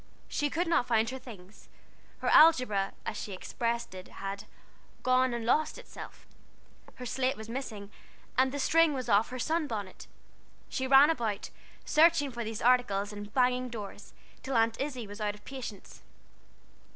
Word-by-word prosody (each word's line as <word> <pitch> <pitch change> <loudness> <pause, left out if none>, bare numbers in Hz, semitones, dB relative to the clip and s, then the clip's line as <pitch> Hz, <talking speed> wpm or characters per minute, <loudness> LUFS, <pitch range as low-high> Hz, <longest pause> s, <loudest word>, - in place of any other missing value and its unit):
She 295 -1 -1
could 340 +5 0
not 330 -7 +2
find 225 -1 +2
her 265 - -6
things. 205 -5 -13 0.5
Her - - -2
algebra, 255 -11 +5
as - - -3
she 205 - -5
expressed 235 +4 -3
it, 185 0 -9
had 195 0 -6 0.6
"gone 255 0 +3
and 235 -1 -3
lost 305 +6 +1
itself," - - -11 0.7
her 250 - -8
slate 260 +2 0
was 220 0 -8
missing, 225 -5 -6 0.4
and 260 +1 +3
the 285 - -4
string 325 +1 +3
was 255 -3 -4
off 205 +1 +4
her 255 - -6
sun 315 +4 0
bonnet. 205 -6 -6 0.6
She 260 - -2
ran 275 +3 +7
about, 220 -9 -3 0.3
searching 315 -3 +4
for 235 -1 -4
these 220 0 -5
articles 215 -5 +2
and 205 0 -8
banging 250 0 +2
doors, 215 -4 -8 0.3
till 265 -1 -4
Aunt 225 +1 +2
Izzie 265 -5 -3
was 205 +2 -9
out 210 -1 -1
of 210 - -19
patience. 250 -7 -8
240 Hz, 165 wpm, -30 LUFS, 210-265 Hz, 0.7 s, ran